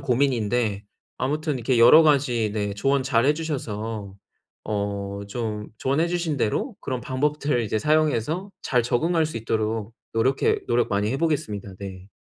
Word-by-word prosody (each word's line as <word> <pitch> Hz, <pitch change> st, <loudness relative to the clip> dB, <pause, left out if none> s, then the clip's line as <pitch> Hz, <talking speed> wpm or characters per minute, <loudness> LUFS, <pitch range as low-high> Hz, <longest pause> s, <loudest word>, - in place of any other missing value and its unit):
고민인데 120 Hz, -5 st, 0 dB, 0.3 s
아무튼 150 Hz, +3 st, -1 dB
이렇게 125 Hz, +1 st, 0 dB
여러 125 Hz, +8 st, +9 dB
가지 130 Hz, -7 st, +2 dB
네 105 Hz, -2 st, -2 dB
조언 135 Hz, +6 st, +1 dB
잘 125 Hz, -2 st, +2 dB
해 150 Hz, -, +4 dB
주셔서 110 Hz, -10 st, -4 dB, 0.5 s
어 100 Hz, -1 st, -3 dB
좀 105 Hz, -2 st, -4 dB
조언해 140 Hz, +8 st, +1 dB
주신 170 Hz, -4 st, -1 dB
대로 160 Hz, -, -1 dB
그런 125 Hz, -2 st, -4 dB
방법들을 145 Hz, -1 st, 0 dB
이제 110 Hz, 0 st, -1 dB
사용해서 155 Hz, -, +1 dB
잘 125 Hz, -2 st, +2 dB
적응할 160 Hz, +7 st, +1 dB
수 155 Hz, -, -6 dB
있도록 110 Hz, 0 st, -2 dB, 0.2 s
노력해 130 Hz, +4 st, +2 dB
노력 120 Hz, 0 st, +2 dB
많이 105 Hz, +1 st, 0 dB
해 135 Hz, -, -1 dB
보겠습니다. 110 Hz, -, -2 dB
네. 95 Hz, -1 st, -8 dB
120 Hz, 320 characters per minute, -24 LUFS, 105-150 Hz, 0.5 s, 여러